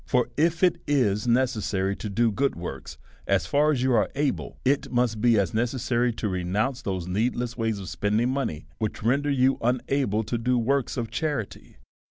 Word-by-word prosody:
For, 125 -1 0
if 165 +4 +1
it 180 - +3
is 125 -6 +1
necessary 110 -6 +1
to 105 - -5
do 115 +3 +2
good 135 +7 0
works 85 +1 -7 0.3
as 95 -4 +2
far 145 - +2
as 130 -4 0
you 130 -1 +2
are 110 -3 +3
able, 145 -1 -2
it 140 +2 +1
must 120 -3 +1
be 120 -1 +4
as 95 -4 +1
ne 110 - +2
cessary 120 0 0
to 110 - -1
renounce 100 +8 -1
those 95 -6 -3
needless 120 +6 -1
ways 115 -2 -1
of 95 -2 -7
spending 105 +8 0
money, 130 - -3
which 110 -2 -3
render 140 +6 +2
you 135 -1 +2
unable 125 -2 0
to 115 +2 -3
do 125 +2 +1
works 135 +3 0
of 115 -2 -3
cha 160 - -1
rity. 135 -9 -5
120 Hz, 195 wpm, -26 LUFS, 105-130 Hz, 0.3 s, be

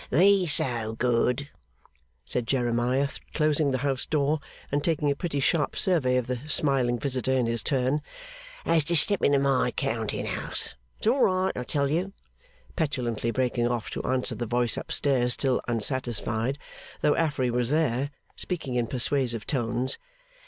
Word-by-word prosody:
'Be 185 +5 +4
so 120 -7 0
good,' 125 +3 +1 0.8
said 120 -2 -2
Jeremiah, 125 +2 +1 0.3
closing 150 -1 +2
the 130 - 0
house 135 -2 -1
door, 150 0 +1 0.3
and 145 +1 0
taking 150 -3 +1
a - - 0
pretty 150 -2 -2
sharp 150 +2 +1
survey 150 -10 +2
of 125 - 0
the 125 0 -3
smiling 135 -5 +2
visitor 130 0 -1
in 130 -2 +2
his 115 -1 -1
turn, 135 +2 +1 0.6
'as 165 -2 +3
to 170 - +2
step 200 +6 +5
into 140 0 +4
my 135 -2 +2
counting 110 -2 -2
house. - - -2 0.2
It's - - -8
all 250 +5 +3
right, 185 0 +2
I 125 - -3
tell 140 +2 -1
you!' 180 +5 -1 0.6
petulantly 120 - -1
breaking 120 0 0
off 120 -3 -2
to - - -3
answer 130 0 -1
the 120 - -4
voice 120 0 +1
up - - -6
stairs, 125 -4 +2
still 130 -2 +1
unsatisfied, 120 +1 -1 0.4
though 150 - +3
Affery 140 -6 0
was 120 0 0
there, 145 -3 +1 0.3
speaking 160 -8 -3
in 120 -2 0
persuasive 125 -2 0
tones. 120 0 -1
130 Hz, 160 wpm, -27 LUFS, 120-150 Hz, 0.8 s, step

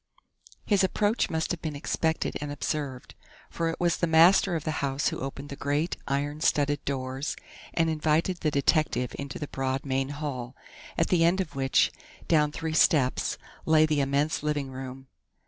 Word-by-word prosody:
His 200 -3 +3
approach 205 +4 +1
must 160 0 -1
have 175 - -3
been 155 -2 -4
expected 160 +2 -1
and 145 -1 -4
observed, 145 -3 -4 0.4
for 165 -1 -1
it 165 - -4
was 175 -1 +2
the 170 - +1
master 170 +3 +5
of 160 - -2
the 155 0 -2
house 140 0 0
who - - -5
opened 135 +1 -6
the 140 - -6
great, 145 +4 -1
iron 145 +2 -2
studded 145 -2 +1
doors 135 +1 -3 0.4
and 165 -1 +3
invited 160 +3 +1
the 155 - +1
detective 140 -3 +1
into 140 -1 -5
the 150 - -5
broad 135 0 -2
main 135 0 -1
hall, 140 -4 -5 0.4
at 165 - +1
the 175 -2 +3
end 175 +3 +3
of 180 -7 -3
which, 135 -1 +3 0.4
down 150 -2 +3
three 160 +1 -4
steps, 145 -4 +3 0.3
lay 155 0 +5
the 155 -2 +1
immense 140 +3 0
living 145 -2 -2
room. 130 0 -7
150 Hz, 175 wpm, -27 LUFS, 135-160 Hz, 0.4 s, master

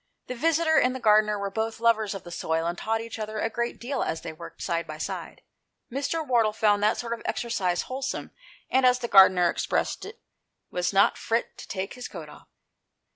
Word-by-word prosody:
The - - -5
visitor 320 +4 +3
and 250 +1 +2
the - - -4
gardener 210 -2 +4
were 200 -1 -3
both 220 +2 -2
lovers 220 -3 +2
of 195 - -7
the 175 - -10
soil, 160 -1 -1
and 170 +1 -1
taught 225 +4 -1
each 230 0 -7
other 215 0 -4
a 225 +1 -1
great 235 +2 -2
deal 260 +2 -3
as 160 - -2
they - - -6
worked 170 +2 -10
side 170 -2 -1
by 155 0 -7
side. 155 - -6 0.5
Mr. 285 +5 -2
Wardle 230 -5 +2
found 210 -1 +2
that 210 +1 +3
sort 235 -1 -3
of 235 - -6
exercise 185 -7 -1
wholesome, 265 +1 -4 0.4
and, 260 +1 +3
as 250 0 +5
the 245 -1 -4
gardener 190 -3 +7
expressed - - -1
it, 440 +3 -10 0.3
" - - -53
was 180 0 0
not 200 0 +3
frit 230 +1 -1
to - - -9
take 195 0 -4
his 250 0 -7
coat - - -9
off." - - -15
220 Hz, 215 wpm, -26 LUFS, 195-250 Hz, 0.5 s, gardener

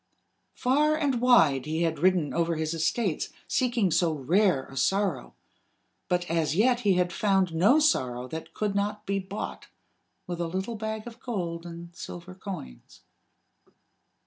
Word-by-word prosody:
Far 295 +4 +2
and 275 -6 0
wide 155 - +4
he 160 +2 0
had 165 -2 -1
ridden 180 -3 +2
over 170 0 +1
his 155 0 -2
estates, 165 +3 0 0.2
seeking 240 -7 +1
so 165 0 +2
rare 155 +1 +2
a 135 - -13
sorrow; 190 -4 0 0.7
but 180 0 0
as 160 -2 0
yet 240 +5 +3
he 205 -5 +3
had 180 -1 +1
found 195 -4 +2
no 200 - +5
sorrow 125 - +1
that 160 +2 -7
could 210 -2 -1
not 210 +1 -2
be 195 0 0
bought 195 +2 -6 0.6
with 175 -1 -4
a 170 - -1
little 190 +7 -3
bag 220 0 -4
of 235 -1 -10
gold 175 -8 -4
and 170 0 -10
silver 175 +2 -8
coins. 185 - -9
180 Hz, 150 wpm, -27 LUFS, 165-215 Hz, 0.7 s, no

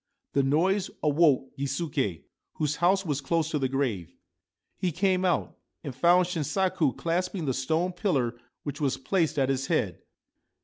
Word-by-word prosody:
The 140 - +3
noise 180 +8 +2
awoke 145 -3 +3
Gisuke, 135 - -2 0.3
whose 150 -1 -1
house 190 +3 +3
was 145 -3 -1
close 160 +2 0
to 150 - 0
the 130 -1 0
grave. 115 - -2 0.6
He 180 - -1
came 185 +2 +1
out, 180 -2 0 0.3
and 140 -5 -5
found 175 +7 +4
Shinsaku 175 -3 0
clasping 175 +1 -1
the 135 - 0
stone 160 +8 0
pillar 150 - 0 0.3
which 145 +1 -5
was 135 -3 +1
placed 165 +2 0
at 135 -1 +2
its 135 0 -1
head. - - 0
155 Hz, 150 wpm, -27 LUFS, 135-180 Hz, 0.6 s, found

